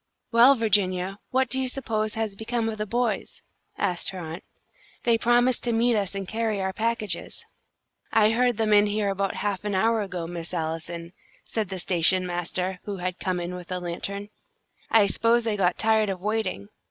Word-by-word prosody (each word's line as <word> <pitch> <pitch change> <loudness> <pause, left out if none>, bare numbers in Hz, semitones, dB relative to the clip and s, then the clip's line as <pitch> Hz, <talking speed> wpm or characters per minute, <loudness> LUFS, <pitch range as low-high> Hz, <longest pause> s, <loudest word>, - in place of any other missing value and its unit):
"Well, 240 +4 +7
Virginia, 195 -4 +1
what 260 0 +2
do 265 +2 +2
you 260 - 0
suppose 220 -5 -2
has 220 -3 -2
become 225 +2 -2
of 215 -1 -5
the 210 - -2
boys?" 235 -1 -2 0.3
asked 175 -2 -1
her 190 - -6
aunt. 165 0 -6 0.6
"They 235 -1 +4
promised 240 +2 +3
to 240 - +1
meet 235 +1 +3
us 200 -2 -1
and 195 -1 -4
carry 220 -1 -1
our 190 0 -1
packages." 225 0 -2 0.7
"I 215 -1 +5
heard 245 0 +2
them 220 -1 +2
in 205 0 +6
here 205 -1 0
about 195 0 -1
half 200 -2 -2
an 205 -1 -1
hour 225 +3 +3
ago, 185 -4 -4
Miss 170 +1 -6
Allison," 170 +1 -4 0.3
said 215 -4 -2
the 190 - -4
station 180 +1 +2
master, 180 +1 -2
who 205 -2 -4
had 180 0 -3
come 185 -1 -1
in 175 +1 -4
with 180 0 -8
a 180 - -1
lantern. 195 +3 -5 0.6
"I 220 -2 +6
s'pose 230 +4 +2
they 225 -2 0
got 185 -3 +1
tired 220 -1 +3
of 190 -2 -3
waiting. 205 - -2
205 Hz, 190 wpm, -26 LUFS, 185-225 Hz, 0.7 s, Well